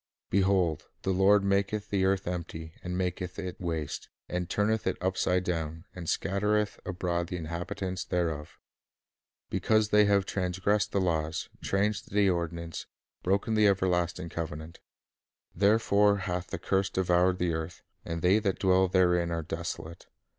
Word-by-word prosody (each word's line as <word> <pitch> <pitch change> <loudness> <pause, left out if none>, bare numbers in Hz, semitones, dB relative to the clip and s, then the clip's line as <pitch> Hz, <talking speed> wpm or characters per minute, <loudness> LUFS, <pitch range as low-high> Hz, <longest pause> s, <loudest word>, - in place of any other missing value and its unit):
"Behold, 95 -4 +2 0.2
the 95 - +1
Lord 100 +2 +5
maketh 100 +2 0
the 95 -2 +2
earth 95 0 +1
empty, 80 -2 -5
and 90 0 -4
maketh 90 -1 -3
it 95 -2 -5
waste, 80 -4 -3 0.2
and 90 -1 -3
turneth 110 +1 +1
it 95 - 0
upside 90 0 +1
down, 80 -1 -3
and 85 -3 -6
scat 100 0 -1
tereth 105 0 +1
abroad 85 -1 -1
the 90 - -4
inhabitants 90 +3 -4
thereof;... 80 -4 -2 0.9
because 110 -1 +2
they 105 0 +6
have 100 -1 +3
transgressed 95 +2 0
the 100 - +1
laws, 80 -4 -1
changed 100 +2 0
the 100 0 +3
ordinance, 85 -1 -4 0.3
broken 100 +4 +1
the 110 -1 +5
everlasting 90 -3 +1
covenant. 80 0 -6 0.7
Therefore 100 +1 +4
hath 90 -2 -3
the - - -4
curse 95 0 0
devoured 90 0 +2
the 90 -2 0
earth, 80 +2 -5 0.2
and 85 0 -4
they 95 +4 +5
that 100 -3 0
dwell 95 0 +4
therein 90 -2 +3
are 85 -1 -2
desolate. 80 +2 -6
90 Hz, 145 wpm, -29 LUFS, 85-100 Hz, 0.9 s, they